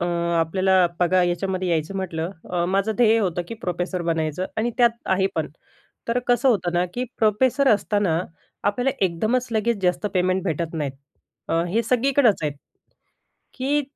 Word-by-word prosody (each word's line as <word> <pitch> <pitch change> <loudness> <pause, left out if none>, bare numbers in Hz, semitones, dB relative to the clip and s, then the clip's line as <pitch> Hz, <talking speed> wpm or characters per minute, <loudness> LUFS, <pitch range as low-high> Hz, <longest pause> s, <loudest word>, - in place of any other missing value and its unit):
अं, 170 0 -1
आपल्याला 190 +4 +1 0.3
बघा 180 +1 +3
याच्यामध्ये 185 +1 -1
यायचं 165 +2 -1
म्हटलं 170 -2 -3 0.2
अ, 175 -1 0
माझं 195 +4 +1
ध्येय 230 -2 +4
होतं 180 -4 -1
की - - -5
प्रोफेसर 180 0 -2
बनायचं 165 +1 -1
आणि 230 +2 0
त्यात 240 -1 +6 0.2
आहे 190 0 +2
पण. 160 -2 -1 0.6
तर 235 +2 +1
कसं 245 +2 +3
होतं 180 -8 +1
ना 175 +1 +2
की 250 - -1
प्रोफेसर 255 +5 +3
असताना 205 -5 +2 0.4
आपल्याला 245 +6 +1
एकदमचं 225 +8 -1
लगेच 220 0 +1
जास्त 180 +2 +1
पेमेंट 185 +1 +1
भेटत 165 -1 -2
नाहीत. 145 -4 -2 0.6
अ, 165 +1 +1
हे 225 +6 +1
सगळीकडचं 250 - +2
आहेत 145 -1 -4 1.0
की 280 +3 +1
190 Hz, 155 wpm, -23 LUFS, 170-230 Hz, 1.0 s, त्यात